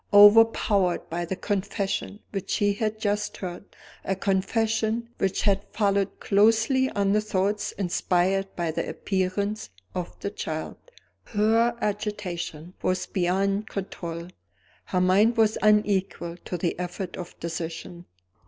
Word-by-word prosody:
Overpowered 205 -3 +6
by 175 +1 -2
the 190 - -3
confession 200 +1 -2
which 195 -2 -4
she 205 0 +2
had 215 +1 -2
just 210 0 -1
heard 180 +1 -6 0.4
a 195 - -1
confession 220 +4 0
which 195 -1 0
had 200 -1 +2
followed 200 -2 +1
closely 225 +6 +3
on 200 -1 +1
the 210 +1 +3
thoughts 205 0 0
inspired 190 +1 +1
by 170 -2 -1
the - - -3
appearance 200 - -2 0.2
of 180 -1 -5
the 200 - -3
child 160 -6 -4 0.5
her 225 +2 +2
agitation 180 -5 -3
was 185 0 0
beyond 195 +3 0
control; 170 -3 -5 0.6
her 180 - 0
mind 205 +6 +4
was 220 -1 +3
unequal 205 -5 +2
to 180 - -3
the 170 0 -2
effort 180 +1 -4
of 180 -1 -8
decision. 170 +1 -5
195 Hz, 125 wpm, -26 LUFS, 180-210 Hz, 0.6 s, Overpowered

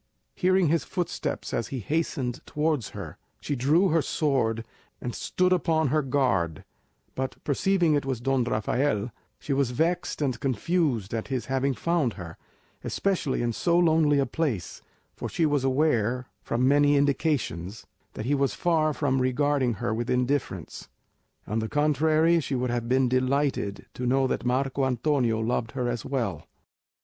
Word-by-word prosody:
Hearing 185 -2 +2
his 165 +1 +2
footsteps 180 -2 -3
as 115 - -1
he 135 - -5
hastened 130 - -2
towards 150 -6 0
her, - - -8 0.2
she 145 - -3
drew 155 +9 +3
her 165 0 +3
sword 125 -7 0 0.3
and 120 - -4
stood 185 0 +1
upon 160 -4 +1
her 155 +3 +2
guard; 125 - 0 0.5
but 130 0 -3
perceiving 170 +3 +2
it 145 - +1
was 135 -3 -2
Don 135 +1 +1
Rafael, 115 0 0 0.3
she 140 - -3
was 135 -2 +1
vexed 160 +8 -1
and 130 -6 -1
confused 130 - 0
at 115 -1 -3
his 130 -5 -2
having 135 +1 0
found 155 -2 0
her, 85 -2 -8 0.5
especially 170 -11 -1
in 120 -1 0
so 170 +8 +1
lonely 160 -4 +4
a 140 - +2
place; 130 - -3 0.3
for - - -5
she 165 - +1
was 145 -3 +1
aware, 130 -3 +1 0.2
from 125 +2 0
many 145 +1 +4
indications, 135 - -1 0.3
that 110 - -5
he 140 - +1
was 140 -1 +1
far 155 -3 +1
from 135 -3 +1
regarding 130 -1 +1
her 105 - -2
with 120 +2 -3
indifference; 125 +2 -2 0.6
on 110 +2 -1
the 110 0 -3
contrary, 155 +3 +3
she 140 -3 -3
would 125 -1 -1
have 120 -1 -2
been 130 0 +3
delighted 130 -4 0
to 125 - -3
know 135 +2 +3
that 130 - -1
Marco 135 +2 0
Antonio 125 -2 +1
loved 115 +1 -1
her 125 -2 -1
as 120 -2 -2
well. 115 - -3
135 Hz, 160 wpm, -26 LUFS, 120-150 Hz, 0.6 s, lonely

